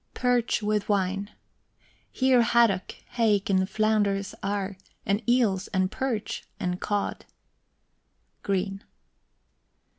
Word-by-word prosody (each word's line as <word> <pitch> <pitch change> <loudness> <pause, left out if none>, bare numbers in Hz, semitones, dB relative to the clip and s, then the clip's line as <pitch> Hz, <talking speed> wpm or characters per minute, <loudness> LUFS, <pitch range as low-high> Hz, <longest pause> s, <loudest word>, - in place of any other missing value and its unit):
PERCH 245 -3 +1
WITH 210 0 0
WINE. 200 0 0 0.8
Here 260 -2 +4
haddock, 230 -5 +3 0.2
hake, 210 -4 +2
and 190 0 +2
flounders 205 -2 +1
are, 200 0 -2 0.3
And 200 +2 +1
eels, 215 -6 +2
and 185 -1 0
perch, 250 -6 -3 0.2
and 180 0 -2
cod. 205 -1 -2 1.2
GREEN. 195 +1 -2
205 Hz, 95 wpm, -26 LUFS, 195-225 Hz, 1.2 s, Here